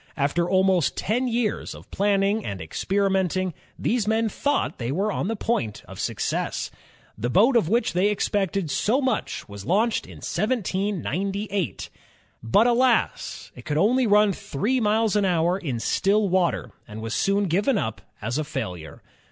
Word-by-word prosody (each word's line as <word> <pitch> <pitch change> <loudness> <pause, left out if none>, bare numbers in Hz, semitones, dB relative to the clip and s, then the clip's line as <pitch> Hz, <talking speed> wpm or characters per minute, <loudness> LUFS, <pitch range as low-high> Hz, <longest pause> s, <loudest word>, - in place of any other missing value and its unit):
After 160 +5 +1
almost 190 -3 +2
ten 245 +5 0
years 235 -3 -1
of - - -14
planning 200 +1 +1
and 100 -2 -5
experimenting, 190 - 0 0.2
these 225 -3 0
men 220 +1 +2
thought 285 +7 -1
they 120 +1 -2
were 195 +8 0
on 185 - -2
the 225 - -1
point 115 - -2
of - - -10
success. - - -2 0.4
The 120 +3 -2
boat 220 - +4
of 215 -9 +3
which 235 +4 +1
they 180 +3 +3
expected 195 -4 -1
so 235 - +2
much 260 -5 -2
was 100 -1 -9
launched 210 - +1
in - - -11
1798. 200 - -2 0.5
But 115 - +3
alas! 245 0 +1
it 125 - -11
could 145 +3 -2
run 185 - +4
only 210 -4 +4
three 215 - -1
miles 215 -1 +2
an 205 - +3
hour 175 0 +2
in 135 -10 -3
still 200 - +2
water, 180 -1 +1 0.2
and 105 -1 -8
was 115 +1 -4
soon 200 +1 +2
given 200 - +1
up 110 - -3 0.2
as 120 +7 -1
a^failure. 90 - -5
195 Hz, 155 wpm, -24 LUFS, 160-215 Hz, 0.5 s, boat